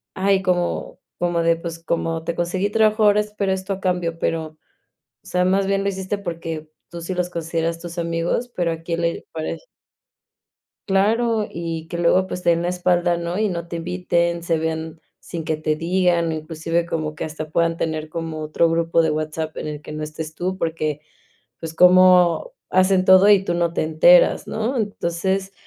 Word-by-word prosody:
"Ay, 195 0 +2
como 180 -2 -1 0.2
como 175 -1 0
de 165 0 +3
pues, 165 0 -6
como 165 -1 -2
te 170 - -2
conseguí 185 +4 -1
trabajo 215 0 +3
ahora, 210 0 +5
espero 210 -2 -2
esto 190 +1 -2
a 190 - -6
cambio", 180 -3 -1
pero, 165 -1 -1
o 155 0 -19 0.7
sea, 180 0 +1
más 195 +1 +2
bien 195 0 +1
lo - - +1
hiciste 190 +1 -3
porque 165 -4 -5 0.2
tú 170 - -7
sí 185 +2 -4
los 180 0 -1
consideras 165 0 -2
tus 170 0 -8
amigos, 170 +8 -1
pero 170 -2 0
a 165 0 -7
quién 170 0 -3
le 170 0 -1
parece. 160 -1 -5 1.3
Claro, 220 +3 +2
y 165 -1 -5
que 170 - -4
luego, 185 +2 +3
pues, 180 - -6
te 170 - +4
den 170 - +1
la 175 - -1
espalda, 175 -1 +1
¿no? 170 +2 -3
Y 215 -1 +1
no 170 -1 -4
te 170 - -6
inviten, 170 0 -1
se 165 -1 0
vean 160 0 -4 0.2
sin 165 -2 -6
que 155 -1 -1
te 155 0 -1
digan, 170 0 +1
inclusive 160 +2 -2
como 155 -2 -3
que 150 - -5
hasta 155 0 -6
puedan 165 +1 +1
tener 155 -1 -3
como 165 -1 -5
otro 155 +2 +1
grupo 165 0 +2
de 160 - +1
WhatsApp 155 +1 -3
en - - -4
el 150 -1 -6
que 150 - -10
no 155 0 -5
estés 155 +1 -6
tú, 185 +3 -3
porque, 155 -3 -2 0.6
pues, 165 -1 -6
cómo 180 - +5 0.2
hacen 185 0 +3
todo 185 +2 +7
y 195 -2 +5
tú 175 - -1
no 170 -1 0
te 160 - -1
enteras, 160 +3 +5
¿no? 225 +4 -2
Entonces, 195 -2 -2
170 Hz, 190 wpm, -21 LUFS, 165-185 Hz, 1.3 s, todo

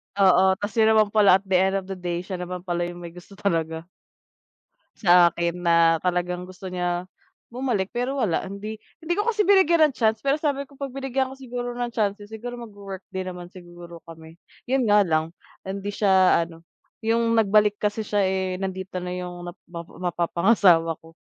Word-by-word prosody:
Oo, 190 -1 +5
kasi 215 +3 +1
naman 215 -2 +4
pala, 205 -4 +6
at 195 - -1
the 190 -2 +2
end 190 +1 +2
of 195 0 -4
the 190 - -5
day, 175 -1 -3
siya 185 -1 -6
naman 180 0 -6
pala 175 -1 -2
yung 175 0 -9
may 170 - -8
gusto 180 +3 -14
talaga. 165 -5 -2 1.2
Sa 175 -2 +7
akin 170 +1 -2
na 170 -1 +4
talagang 180 +1 -2
gusto 185 0 -9
niya 175 -1 -2 0.5
bumalik, 235 -6 -2
pero 250 +3 -2
wala. 195 -7 0
Hindi 210 +3 -7 0.2
hindi 335 +2 0
ko 415 +3 -1
kasi 430 -3 +2
binigyan 340 -6 +5
ng - - -28
chance. 220 -1 +1
Pero 275 +2 +1
sabi 285 -2 -1
ko, 280 0 -20
'pag 275 -2 -4
binigyan 265 -1 -1
ko - - -9
siguro 245 -2 -6
ng 240 0 -3
chances, 205 -2 -2
siguro 240 +2 -6
magwo-work 200 -5 -9
din 190 -1 -4
naman 180 -1 -8
siguro 175 -2 -12
kami. 165 0 -13 0.3
Yun 265 -3 +2
nga 205 0 +5
lang, 160 -1 -1 0.3
hindi 200 +1 -4
siya 190 -4 +4
ano, 165 0 -15 0.4
yung 230 +1 +1
nagbalik 210 -1 +3
kasi 210 +1 -2
siya, 205 -1 +1
eh, 190 -1 -1
nandito 190 0 -5
na 180 - -4
yung 180 -1 -6
nap 175 +2 -9
mapa 170 -1 -9
mapapangasawa 175 -1 +2
ko. 165 0 -17
190 Hz, 185 wpm, -24 LUFS, 175-220 Hz, 1.2 s, Sa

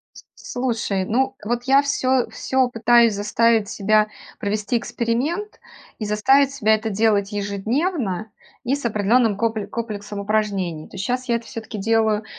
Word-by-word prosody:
С - - -13
слушай, 230 -6 -2
ну 265 +5 0
вот, 240 +2 -2
я 270 +2 +5
всё 260 -3 +1
всё 260 -1 0
пытаюсь 235 -1 +4
заставить 215 +1 +2
себя 215 0 +2 0.3
провести 210 +3 -1
эксперимент 265 - -2 0.4
и 215 - -4
заставить 265 +7 +3
себя 220 -6 +3
это 220 +1 -2
делать 205 -1 +2
ежедневно 215 - -2 0.3
и 260 +3 +1
с 285 - -5
определенным 220 0 +2
копле 220 -1 -1
комплексом 210 -3 -5
упражнений. 200 -6 -1
То - - -18
есть 190 - -3
щас 250 +2 -2
я 235 - +2
это 230 - -7
всё-таки 220 -1 -7
делаю 220 0 +1
225 Hz, 150 wpm, -22 LUFS, 205-245 Hz, 0.4 s, я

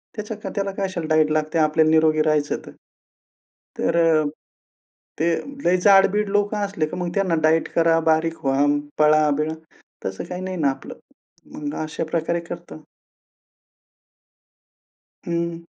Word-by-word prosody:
त्याचा 210 0 -5
क - - -4
त्याला 195 -1 -1
काय 195 - 0
असेल 175 -4 -4
डायट 155 -1 +3
लागते 155 +1 0
आपल्याला 155 0 +3
निरोगी 155 -1 +4
राहायचं 150 -2 +1
तर. - - -10 1.1
तर 165 -2 +3 1.0
ते 165 - +2 0.4
लय 180 +1 +4
जाड-बीड 200 +1 +5
लोकं 205 +1 0
असले 195 -6 -2
तर 155 - -7
मग 175 -1 -3
त्यांना 190 -4 +1
डायट 160 +1 +3
करा, 165 0 +4
बारीक 160 0 0
व्हा, 135 +1 +2 0.3
पळा-बिळा 150 0 +3 0.5
तसं 95 - -4
काही 180 +1 -6
नाही 185 0 -4
ना 145 -4 +2
आपलं. 135 - -8 0.6
मग 145 0 -5
अशा 155 +1 -4
प्रकारे 170 +1 0
करतो. 170 -2 -8 2.4
हं. 170 0 -3
165 Hz, 135 wpm, -22 LUFS, 155-180 Hz, 2.4 s, जाड-बीड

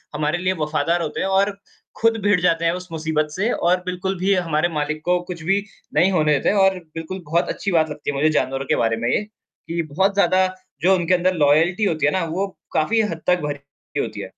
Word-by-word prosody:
हमारे 150 +3 0
लिए 185 +1 0
वफ़ादार 155 +3 0
होते 155 - -4
हैं 190 - 0
और 200 +1 +1 0.4
खुद 230 0 +3
भिड़ 205 -3 +3
जाते 170 -1 +2
हैं 165 - +3
उस 180 0 -6
मुसीबत 155 -1 -1
से 205 +9 -1
और 180 +1 +1
बिल्कुल 185 +1 -3
भी 195 +2 +2
हमारे 175 -2 +1
मालिक 155 +1 -2
को 180 0 +2
कुछ 165 -3 -7
भी 195 +3 +1 0.3
नहीं 185 +2 +4
होने 155 -4 +3
देते 140 - +1
हैं 205 - +1
और 190 -1 +4 0.2
बिल्कुल 180 +3 -6
बहुत 170 +3 0
अच्छी 200 - -2
बात 160 -2 +2
लगती 150 -1 -4
है 140 - -7
मुझे 155 +3 +3
जानवरों 135 +1 -3
के - - +1
बारे 115 0 +1
में - - +2
ये 210 - +1
कि 170 -5 -7
बहुत 195 +2 +3
ज़्यादा 185 -1 +3 0.3
जो 190 +2 +5
उनके 175 0 +1
अंदर 180 +1 +2
लॉयल्टी 165 +6 +3
होती 155 -5 0
है 150 - +3
ना 185 0 0
वो 200 - 0 0.3
काफ़ी 220 +9 +2
हद 165 -1 -6
तक 180 0 +4
भरी 145 -1 -3 0.4
हुई - - +1
होती - - -8
है। - - -8
175 Hz, 235 wpm, -21 LUFS, 155-190 Hz, 0.4 s, जो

